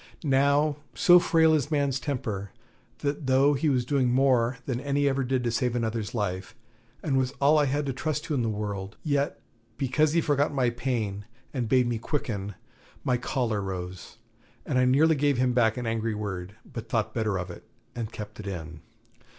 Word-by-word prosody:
Now 140 +1 +3 0.2
so 180 -2 +7
frail 160 -2 +4
is 150 -1 +1
man's 140 -3 +1
temper, 110 -9 -3 0.6
that 140 0 -2
though 135 +2 +4
he 150 +2 +1
was 125 -3 +1
doing 130 -2 +2
more 125 -2 +3
than 125 -3 -2
any 140 0 +1
ever 135 0 +1
did 130 0 0
to 120 - 0
save 125 +1 0
another's 110 -2 -2
life, 95 -3 -3 0.5
and 135 -3 +1
was 130 0 -1
all 150 +2 +5
I 145 - +3
had 145 +2 0
to 135 - -2
trust 150 +3 -2
to 155 - -3
in 135 - +1
the 115 - 0
world; 105 -1 -4
yet 145 -2 0 0.4
because 145 +3 +2
he 170 - +4
forgot 145 -2 +1
my 125 -3 +2
pain 115 -5 -2 0.3
and 120 -5 -2
bade 130 0 +4
me 120 -2 -1
quicken, 105 -7 -3 0.5
my 125 - +2
choler 120 -4 -1
rose, 90 -2 -6 0.5
and 130 - +1
I 125 - +4
nearly 145 +6 +5
gave 145 -1 +2
him 125 0 +2
back 120 -1 +3
an 125 - -3
angry 115 -1 -1
word, 100 -2 -5
but 115 -1 -8
thought 110 -2 0
better 110 -4 0
of 90 -1 -4
it - - -11 0.3
and 115 -2 -4
kept 105 -1 -8
it 105 - -7
in. 80 -4 -6
125 Hz, 190 wpm, -27 LUFS, 110-140 Hz, 0.6 s, so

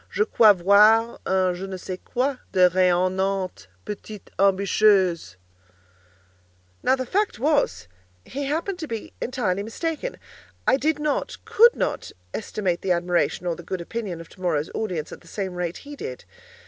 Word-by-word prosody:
Je 430 - +1
crois 220 - +6
voir 210 +5 +5
en 185 -1 +2
je 180 +2 -6
ne 190 -1 -5
sais 185 0 -6
quoi 260 +1 -1
de 185 - +2
rayonnante, 185 - +1 0.2
petite 210 0 -8
ambitieuse!" 195 - +3 1.5
Now - - +3
the 260 -1 -4
fact 410 - 0
was, 275 - +1 0.4
he 280 +2 -4
happened 335 +6 -2
to 315 - -5
be 225 -4 -6
entirely 210 -7 -1
mistaken. 325 - -4 0.5
I - - +4
did 300 +2 +1
not—could 355 +9 +2
not—estimate 175 - -3
the 190 - -1
admiration 175 0 0
or 175 -1 0
the - - -10
good 185 +2 -4
opinion 190 -1 -5
of 165 - -10
tomorrow's 170 -5 -2
audience 180 -8 -3
at - - -10
the 170 - -19
same 190 +1 -4
rate 175 -1 -3
he 290 0 -8
did. 130 - -7
195 Hz, 150 wpm, -24 LUFS, 180-255 Hz, 1.5 s, crois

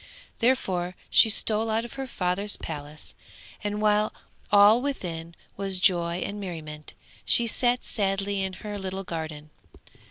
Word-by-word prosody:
Therefore 185 -8 +1 0.2
she 225 - +7
stole 220 +1 +3
out 225 +1 0
of 240 - -10
her 270 -1 -5
father's 200 -1 0
palace, 150 -1 -7 0.5
and 210 0 -2
while 210 0 +3 0.4
all 205 +3 +7
within 170 -12 -4 0.2
was 195 -1 0
joy 175 -2 +2
and 205 +1 -5
merriment, 155 -5 -7 0.3
she 235 - +3
sat 245 +1 +1
sadly 200 -1 -1
in 190 -1 -2
her 205 +2 -6
little 190 0 -4
garden. 155 -3 -6
195 Hz, 135 wpm, -26 LUFS, 175-215 Hz, 0.5 s, she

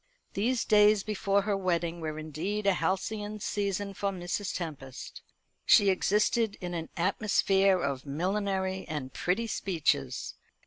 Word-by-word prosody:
These 230 +4 0
days 210 -1 +5
before 200 -1 0
her 205 0 0
wedding 170 -3 -1
were 155 -1 -4
indeed 160 +7 -3
a 200 - +5
halcyon 205 +5 -2
season 200 -1 -2
for 200 +1 -1
Mrs. 185 +1 -3
Tempest. 140 -7 -7 0.4
She 200 -1 +6
existed 210 +3 +1
in 180 -2 -5
an 165 -1 -4
atmosphere 195 0 +3
of 140 -5 -2
millinery 190 +4 -1
and 145 -5 -5
pretty 190 +6 0
speeches. 150 - -1
190 Hz, 130 wpm, -29 LUFS, 170-205 Hz, 0.4 s, She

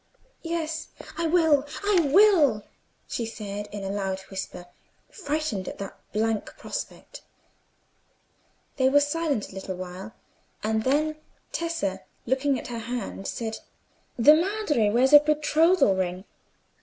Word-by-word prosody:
"Yes, 325 -1 -3 0.3
I 335 -1 -1
will, 320 -4 +4 0.2
I 405 -2 +3
will," 320 - +5 0.4
she 235 - -3
said, 205 -2 -6
in 205 -1 -6
a 195 - -3
loud 195 -1 -2
whisper, 190 -2 -6 0.5
frightened 300 - -3
at - - -6
that 195 -1 -7 0.2
blank 220 0 -1
prospect. - - -7 1.6
They 260 -1 +4
were 285 +2 +5
silent 290 -5 -1
a - - -14
little 190 -1 -5
while; 185 +4 -8 0.5
and 220 0 0
then 305 +3 +1 0.3
Tessa, 205 - -2 0.2
looking 265 +2 +1
at - - -7
her 235 -1 -4
hand, 230 -4 -5
said— 225 -1 -4 0.6
"The 275 +6 +8
Madre 330 - +1
wears 255 +6 +3
a 295 - +12
betrothal 305 - +3
ring. 185 0 -2
255 Hz, 130 wpm, -26 LUFS, 205-310 Hz, 1.6 s, a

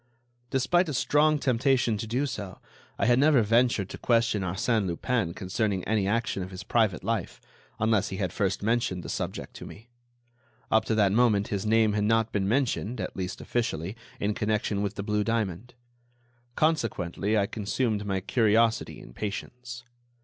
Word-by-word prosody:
Despite 165 +7 +2
a 145 - -2
strong 150 +3 +3
temptation 130 -3 +2
to 110 - -4
do 125 +6 0
so, 105 -8 -6 0.4
I - - +1
had 120 +1 +4
never 140 -4 +5
ventured 115 -2 +2
to - - -8
question 115 -3 +2
Arsène 95 +3 0
Lupin 90 +1 -1
concerning 95 0 -1
any 105 -3 0
action 115 -1 0
of 90 - -5
his 90 0 -8
private 105 -3 +1
life, 110 -3 -2 0.4
unless 110 -2 +1
he 95 - -5
had 90 -3 -2
first 100 -2 -1
mentioned 110 -5 0
the - - -7
subject - - -4
to - - -9
me. 115 +4 -13 0.8
Up 110 - +4
to 110 - 0
that 100 -3 +3
moment 110 -2 +3
his 100 +1 -2
name 110 -1 +3
had 105 0 +1
not 115 +1 +2
been 95 -2 0
mentioned, 125 0 0
at - - -4
least 90 -1 -4
officially, 110 -6 -2 0.2
in 105 +1 0
connection 105 -1 -1
with 100 0 -2
the 100 - -4
blue 105 0 0
diamond. 115 +1 -2 0.8
Consequently, 110 - 0
I 100 - +3
consumed 105 +1 -1
my 95 -2 -2
curiosity 115 +1 +2
in - - -13
patience. 120 - -6
110 Hz, 170 wpm, -27 LUFS, 100-120 Hz, 0.8 s, never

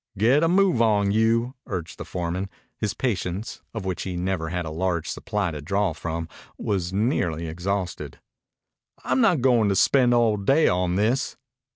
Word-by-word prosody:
"Get 120 +9 +4
a 165 - +3
move 185 -7 +3
on 105 -3 +3
you!" 115 +3 +2
urged 90 -8 -5
the - - -5
foreman. 90 +2 -3 0.3
His 105 -3 -3
patience, 100 -4 -3
of 110 -4 -6
which 95 -2 -2
he 90 -2 -4
never 90 -2 -2
had 90 0 -3
a 80 - -5
large 85 0 -1
supply 100 -4 -2
to 75 -2 -6
draw 95 +3 0
from, 80 0 -4 0.3
was 90 -4 -2
nearly 95 - 0
exhausted. 90 +2 -3 0.8
"I'm 130 0 +1
not 155 -2 +3
goin' 120 -5 +4
to 100 - +1
spend 125 +4 +4
all 115 -3 +3
day 135 +11 +3
on 90 0 +1
this." 115 +8 0
100 Hz, 170 wpm, -24 LUFS, 90-115 Hz, 0.8 s, Get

